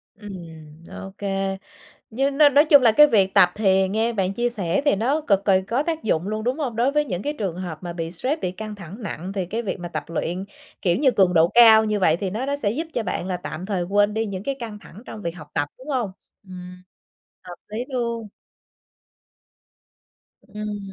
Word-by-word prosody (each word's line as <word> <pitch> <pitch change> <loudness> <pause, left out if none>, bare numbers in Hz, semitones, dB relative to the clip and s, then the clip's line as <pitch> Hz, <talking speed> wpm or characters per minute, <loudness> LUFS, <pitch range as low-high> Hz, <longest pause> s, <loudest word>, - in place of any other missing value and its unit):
Ừm, 165 -6 -11
OK. 195 0 -9 0.9
Nhưng 275 +5 -1
nói 295 -1 +7
nói 285 +2 +5
chung 285 -3 +6
là 225 -3 +5
cái 300 +6 +8
việc 195 -7 +2
tập 180 - +7
thì 190 -2 +2
nghe 220 +4 0
bạn 195 -4 -1
chia 240 +2 0
sẻ 195 -3 -1
thì 285 - +4
nó 270 +9 +1
cực 200 -9 +1
kì 190 -2 +4
có 245 +5 0
tác 325 0 -3
dụng 185 -3 0
luôn, 215 0 -3
đúng 250 +5 -1
hông? 260 -7 -3
Đối 240 +4 +2
với 300 0 +2
những 180 -9 -4
cái 295 - -2
trường 185 -5 -3
hợp 175 -4 -6
mà 175 -1 -5
bị 165 -1 -4
stress, 260 - -2
bị 180 - -2
căng 215 +2 -7
thẳng 200 +4 -10
nặng 190 -2 -5
thì 190 -3 -3
cái 225 +6 -3
việc 200 - -4
mà 175 0 -6
tập 155 -2 -5
luyện, 170 +3 -3 0.4
kiểu 175 -2 +2
như, 270 -2 +4
cường 185 -5 +3
độ 165 +1 +5
cao 225 -2 +8
như 210 -1 -1
vậy 165 -3 +4
thì 190 0 -3
nó 230 +7 -3
nó 280 +1 -1
sẽ 205 -8 -1
giúp 315 +9 -3
cho 235 - -1
bạn 180 -2 -3
là 185 -1 -2
tạm 180 +1 -7
thời 185 -4 -1
quên 205 +2 +2
đi 220 0 -1
những 195 -2 -5
cái 275 - -2
căng 225 -4 -7
thẳng 210 +1 -14
trong 210 - -8
việc 170 - -3
học 150 -3 -12
tập, 145 - 0
đúng 260 +4 -13
hông? 245 -9 -1 0.3
Ừm, 180 -1 -11 0.6
hợp 180 -1 -9
lý 220 +4 -4
luôn. 235 -3 -2 2.2
Ừm. 210 0 -6
205 Hz, 225 wpm, -23 LUFS, 180-235 Hz, 2.2 s, cái